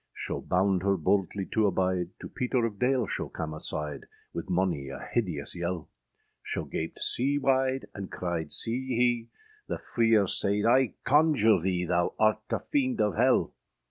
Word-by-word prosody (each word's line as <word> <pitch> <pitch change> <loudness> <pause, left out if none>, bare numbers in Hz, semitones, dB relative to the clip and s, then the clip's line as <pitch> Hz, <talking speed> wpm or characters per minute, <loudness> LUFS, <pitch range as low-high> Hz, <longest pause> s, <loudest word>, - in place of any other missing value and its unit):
Scho - - -4
bound 95 0 +1
her 100 0 +2
boldly 95 +3 0
to 110 -2 +3
abide, 90 -2 0
To - - -6
Peter 125 -1 0
of 105 -3 -4
Dale 125 -1 +2
scho - - -3
cam 80 -1 -5
aside, 75 -2 -4 0.3
Wyth 85 - -5
mony 90 -7 0
a 70 - -6 0.2
hideous 90 -12 -1
yelle; 85 -1 -3 0.5
Scho - - -4
gaped 80 +1 -4
sea 140 +4 +1
wide 135 -1 +1
and 100 -2 -7
cryed 85 -4 -3
sea 125 +3 -1
hee, 120 -2 +1 0.4
The - - -2
freer 115 -3 +2
sayd, 100 +2 0
âI 125 +1 +4
conjure 135 - +4
thee, 90 0 0
Thou 85 0 0
art 110 0 +3
a - - -1
fiend 260 -5 0
of 105 -5 +2
helle! - - +3
100 Hz, 165 wpm, -28 LUFS, 90-120 Hz, 0.5 s, âI